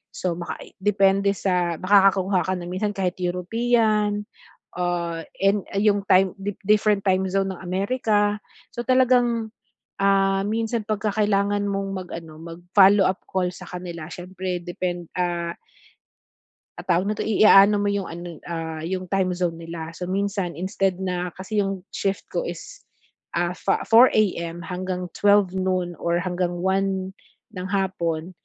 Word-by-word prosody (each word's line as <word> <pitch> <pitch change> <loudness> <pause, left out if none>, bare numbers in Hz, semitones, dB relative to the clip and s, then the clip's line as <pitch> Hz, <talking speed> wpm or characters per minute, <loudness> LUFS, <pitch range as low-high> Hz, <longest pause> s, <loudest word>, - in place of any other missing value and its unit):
So, 175 -2 -2
makai 175 - -7
depende 200 0 +2
sa 180 -2 0
makakakuha 195 -1 +4
ka 185 - +1
na 175 -1 -6
minsan 205 +2 -2
kahit 185 -1 -2
European 210 +3 +1 0.5
ah, 170 -2 -2 0.2
in 195 0 +2
ay 200 - +2
yung 200 -1 +1
time, 190 -2 +4 0.3
different 210 0 +3
time 190 -1 +2
zone 195 +1 0
ng - - -13
Amerika. 205 +2 0 0.3
So, 240 - -5
talagang 245 -3 +3 0.5
ah, 195 0 +3
minsan 225 +1 -1
'pag 215 -1 -1
ka - - +3
kailangan 205 -1 +1
mong 195 0 -2
mag 185 -2 -5
ano 160 -2 -8
mag-follow 180 +4 +4
up 185 - -1
call 185 -2 0
sa - - -11
kanila 175 -3 -7
siyempre 180 0 -5
depend 175 -1 -4
ah 175 -1 -2 1.2
ah, - - -9
tawag 180 +1 +2
nito? 215 - -3
I 215 -1 +2
a 195 -2 +9
ano 210 - +1
mo 205 - +1
'yong 200 -3 -2
ano 170 -1 -8
ah, 165 -2 -4
'yong 185 +1 -4
time 185 -2 +1
zone 175 -2 -2
nila. 165 -1 -6
So, 180 +2 -6
minsan 195 -3 -2
instead, 190 +1 -1
na 180 -1 -2
kasi 205 +3 -3
'yong 195 -2 -2
shift 195 0 -2
ko - - -2
is, - - -8 0.5
ah, 175 0 +1
fa 195 - 0
4:00 195 -8 +4
hanggang 180 +1 -4
12:00 205 -2 +3
noon 185 -2 -1
or 170 0 0
hanggang 180 -1 -1
1:00 190 0 0 0.4
ng 185 0 -4
hapon, 185 -4 -2
190 Hz, 150 wpm, -23 LUFS, 175-200 Hz, 1.2 s, a